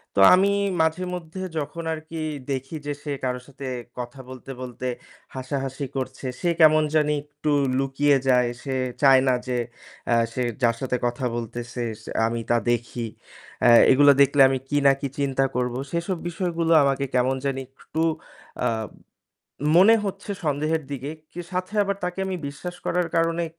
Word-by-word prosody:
তো 100 - +4
আমি 195 +2 +3 0.3
মাঝেমধ্যে 180 +1 -2 0.2
যখন 165 +3 -5
আর 155 - -4
কি 165 -1 -5 0.3
দেখি 135 +4 -4
যে 145 - -2
সে 145 - -4
কারো 125 -1 -1
সাথে 135 -1 -8 0.3
কথা 120 +2 -6
বলতে, 130 +1 -9
বলতে 125 0 -5 0.5
হাসাহাসি 135 +1 -3
করছে 130 0 -5 0.2
সে 175 - +1
কেমন 155 0 +7
জানি 150 -1 +3
একটু 150 0 -4 0.3
লুকিয়ে 135 +1 +2
যায়। 125 -2 +4
সে 135 -2 -3 0.3
চায় 135 -2 +7
না 130 - +4
যে 125 -1 -1 0.5
অ্যা 120 - +3 0.2
সে 125 - -1 0.2
যার 115 -1 +4
সাথে 125 -1 -1
কথা 120 +2 -1
বলতেছে 120 +1 -5 0.2
সে - - -8 0.2
আমি 115 0 -2
তা 120 - +4
দেখি। 120 0 -2 0.5
অ্যা 120 - +6 0.2
এগুলা 145 +2 +7
দেখলে 140 0 +5
আমি 135 -1 0
কি 145 - +1
না - - +8
কি 140 - -1
চিন্তা 135 -1 +1
করব 125 -1 0 0.2
সেসব 170 +2 -2
বিষয়গুলো 170 -1 -1
আমাকে 140 0 +1
কেমন 130 +1 +2
জানি 135 -1 -1 0.2
একটু 160 - -4 0.6
আ - - +4 1.1
মনে 210 +6 +7
হচ্ছে 195 +1 -5
সন্দেহের 155 +2 0
দিকে 140 +2 -4 0.2
কে 175 - -6
সাথে 185 +3 -3
আবার 200 0 -1
তাকে 180 +1 -3
আমি 190 - -2
বিশ্বাস 175 +5 -7
করার 175 -1 +1
কারণে 165 +1 +1
140 Hz, 165 wpm, -24 LUFS, 130-165 Hz, 1.1 s, না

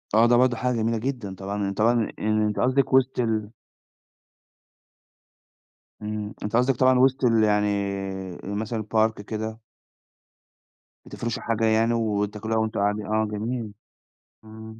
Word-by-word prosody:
آه، 115 +2 +6
ده 120 - +4
برضو 125 0 +3
حاجة 125 +1 -1
جميلة 115 0 0
جدًا، 115 -5 -4
طبعًا 100 +1 -3
طبعًا 115 +3 +2
آآ - - -6
يعني 110 0 +2
أنتِ 105 -1 -2
قصدِك 130 +2 +1
وسط 130 0 +3
ال 110 -3 0 2.5
إمم، 105 0 -4
أنتِ 105 +2 -2
قصدِك 125 +2 +3
طبعًا 130 +1 +4
وسط 130 0 +3
ال 115 -2 +4
يعني 105 -1 +3 0.8
مثلًا 110 +2 -3
الpark 110 0 +1
كده. 110 +1 -5 1.5
بتفرشوا 120 +2 -4
حاجة 115 -1 0
يعني 110 +1 +3
وتاكلوها 105 -1 -1
وأنتم 110 -1 -1
قاعدي 105 +1 0
آه 110 +1 +1
جميل، 110 +1 -4 0.7
إمم. 110 0 -11
110 Hz, 135 wpm, -25 LUFS, 105-120 Hz, 2.5 s, آه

